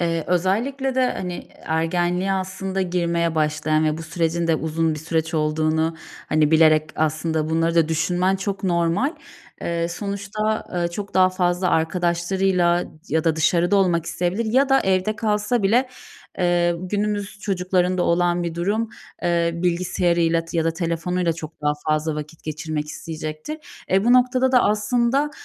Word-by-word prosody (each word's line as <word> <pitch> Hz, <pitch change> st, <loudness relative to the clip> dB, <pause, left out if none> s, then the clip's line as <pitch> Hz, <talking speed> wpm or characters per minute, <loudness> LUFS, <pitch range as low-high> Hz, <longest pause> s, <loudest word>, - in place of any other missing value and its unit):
Eee, 165 Hz, -2 st, 0 dB
özellikle 235 Hz, +10 st, 0 dB
de 255 Hz, -1 st, +2 dB
hani 180 Hz, -1 st, -6 dB
ergenliğe 175 Hz, +4 st, 0 dB
aslında 190 Hz, 0 st, -2 dB
girmeye 170 Hz, -2 st, 0 dB
başlayan 155 Hz, 0 st, +1 dB
ve 155 Hz, +1 st, 0 dB
bu -, -, -6 dB
sürecin 165 Hz, +1 st, -1 dB
de 165 Hz, -, +3 dB
uzun 160 Hz, 0 st, -1 dB
bir 155 Hz, -, -6 dB
süreç 160 Hz, +1 st, -2 dB
olduğunu 155 Hz, +1 st, 0 dB, 0.3 s
hani 155 Hz, -1 st, +2 dB
bilerek 155 Hz, -1 st, +4 dB
aslında 155 Hz, 0 st, 0 dB
bunları 165 Hz, +1 st, +1 dB
da 165 Hz, -2 st, +3 dB
düşünmen 180 Hz, +4 st, +1 dB
çok 195 Hz, +1 st, -4 dB
normal. 170 Hz, -, +1 dB, 0.5 s
Eee, 170 Hz, 0 st, -1 dB
sonuçta, 200 Hz, +3 st, -3 dB
eee, 175 Hz, -1 st, 0 dB
çok 200 Hz, +3 st, -7 dB
daha 185 Hz, 0 st, +5 dB
fazla 180 Hz, 0 st, 0 dB
arkadaşlarıyla 175 Hz, +1 st, +1 dB, 0.2 s
ya 160 Hz, +2 st, 0 dB
da 160 Hz, -1 st, +2 dB
dışarıda 175 Hz, +4 st, +2 dB
olmak 175 Hz, -4 st, +2 dB
isteyebilir 180 Hz, +6 st, -1 dB
ya 270 Hz, +2 st, +4 dB
da 270 Hz, 0 st, +4 dB
evde 190 Hz, +3 st, +1 dB
kalsa 210 Hz, +1 st, 0 dB
bile, 240 Hz, +7 st, +3 dB, 0.5 s
eee, 175 Hz, -1 st, +2 dB
günümüz 205 Hz, +2 st, -2 dB
çocuklarında 185 Hz, -2 st, 0 dB
olan 175 Hz, 0 st, +2 dB
bir 170 Hz, -1 st, -3 dB
durum, 205 Hz, +6 st, -1 dB, 0.3 s
eee, 170 Hz, -1 st, +2 dB
bilgisayarıyla 170 Hz, -1 st, +1 dB
t 165 Hz, 0 st, -4 dB
ya 160 Hz, -, +1 dB
da 165 Hz, -, +2 dB
telefonuyla 170 Hz, +1 st, -1 dB
çok 160 Hz, -1 st, -9 dB
daha 150 Hz, -, +2 dB, 0.2 s
fazla 155 Hz, 0 st, +1 dB
vakit 150 Hz, +1 st, -8 dB
geçirmek 155 Hz, 0 st, -3 dB
isteyecektir. 155 Hz, -, -6 dB, 0.3 s
E, 195 Hz, +2 st, +3 dB
bu 240 Hz, -, +5 dB
noktada 255 Hz, +1 st, +3 dB
da 250 Hz, -, +5 dB
aslında, 235 Hz, +7 st, +1 dB
175 Hz, 150 wpm, -22 LUFS, 160-195 Hz, 0.5 s, daha